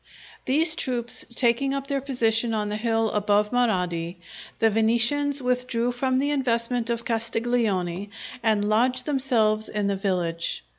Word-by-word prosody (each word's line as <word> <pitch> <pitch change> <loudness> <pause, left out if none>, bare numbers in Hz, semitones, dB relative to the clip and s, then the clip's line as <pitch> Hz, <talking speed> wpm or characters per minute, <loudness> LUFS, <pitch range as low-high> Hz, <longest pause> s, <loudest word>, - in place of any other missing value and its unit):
These 310 +5 +3
troops 240 -5 -1
taking 255 +3 +2
up 275 0 -4
their 275 -1 -2
position 230 -4 +1
on 210 -1 -2
the 210 - -2
hill 225 0 0
above 210 0 +1
Marradi, 180 -8 0 0.4
the 225 -1 +3
Venetians 235 +6 +2
withdrew 250 -1 0
from 255 +1 -1
the 285 +2 0
investment 240 -3 0
of 235 0 -2
Castiglione 225 -5 -1 0.3
and 210 -2 +1
lodged 250 +4 +1
themselves 235 -7 +1
in 210 -1 -2
the 200 0 0
village. 175 -4 -2
230 Hz, 140 wpm, -24 LUFS, 210-255 Hz, 0.4 s, These